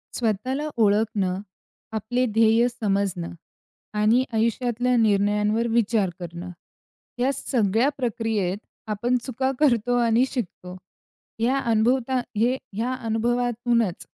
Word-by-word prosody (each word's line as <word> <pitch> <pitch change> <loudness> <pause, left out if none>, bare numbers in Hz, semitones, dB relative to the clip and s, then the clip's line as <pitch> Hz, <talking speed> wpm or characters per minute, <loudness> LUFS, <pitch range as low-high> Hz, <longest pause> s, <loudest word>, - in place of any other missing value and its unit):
स्वतःला 255 +6 -1 0.2
ओळखणं, 205 -3 +1 0.5
आपले 235 +4 -1
ध्येय 225 +2 +4
समजणं 200 -7 -1 0.7
आणि 225 +4 +4
आयुष्यातल्या 240 +2 +1
निर्णयांवर 210 +1 +2
विचार 225 -3 +2
करणं, 175 +1 -7 0.7
या 255 +3 +2
सगळ्या 230 0 +1
प्रक्रियेत 220 -6 -1 0.3
आपण 240 +4 +1
चुका 260 +1 -1
करतो 245 -4 +3
आणि 230 +2 +3
शिकतो. 180 -7 -5 0.7
हे 230 - +3
अनभवता, 250 0 +1 0.6
या 245 +3 0
अनुभवातूनच 235 -3 0
225 Hz, 95 wpm, -24 LUFS, 210-245 Hz, 0.7 s, ध्येय